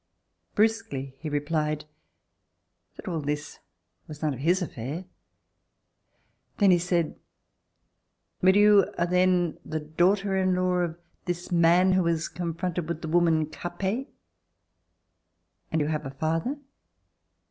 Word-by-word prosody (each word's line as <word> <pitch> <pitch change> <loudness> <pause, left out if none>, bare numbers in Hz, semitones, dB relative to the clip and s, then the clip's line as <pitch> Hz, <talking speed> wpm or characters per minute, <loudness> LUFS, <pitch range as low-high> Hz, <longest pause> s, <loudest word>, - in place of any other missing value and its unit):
Brusquely 215 -12 0
he 155 - -5
replied 150 +1 -1 1.1
that - - -11
all 170 -3 -1
this 145 +1 -4 0.5
was 150 0 -9
none 150 -2 +1
of 130 - -8
his 175 +6 +2
affair. 150 +5 -5 1.5
Then 200 -3 +5
he 175 - +5
said: 170 -2 -1 1.2
"But 190 +1 +5
you 205 -1 +6
are 170 - +2
then 180 -2 +2
the 155 0 -3
daughter 185 +6 +1
in 185 -1 +2
law 180 0 +1
of 170 -2 -2 0.3
this 175 +1 -4
man 175 +2 +5
who 185 0 +3
was 165 -1 0
confronted 175 -1 -3
with 170 -1 -4
the 160 - -3
woman 165 -2 +3
Capet?... 190 - -4 1.6
And 160 - +1
you 150 - +1
have 150 -2 -2
a - - -5
father 160 - -2
170 Hz, 125 wpm, -27 LUFS, 155-185 Hz, 1.6 s, you